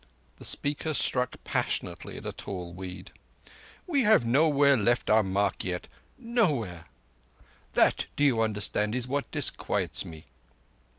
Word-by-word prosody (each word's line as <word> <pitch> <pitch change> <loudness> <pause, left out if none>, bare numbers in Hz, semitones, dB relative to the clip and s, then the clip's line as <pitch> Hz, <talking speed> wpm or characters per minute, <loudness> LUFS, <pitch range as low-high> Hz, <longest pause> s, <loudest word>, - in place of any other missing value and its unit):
The - - -9
speaker 150 +2 +1
struck 125 -2 0
passionately - - -2
at - - -9
a - - -2
tall 90 -3 -6
weed. 90 0 -8 0.7
"We 295 -7 +2
have 215 - +5
nowhere 140 +2 +4
left 120 0 +1
our 110 +1 +6
mark 100 0 0
yet. 90 -1 -4 0.3
Nowhere! 150 - 0 0.9
That, - - +3
do 145 - 0
you 125 -6 +4
understand, 105 0 0
is 125 -1 -2
what 140 +2 -2
disquiets - - -1
me." 80 -1 -11
120 Hz, 130 wpm, -28 LUFS, 100-145 Hz, 0.9 s, our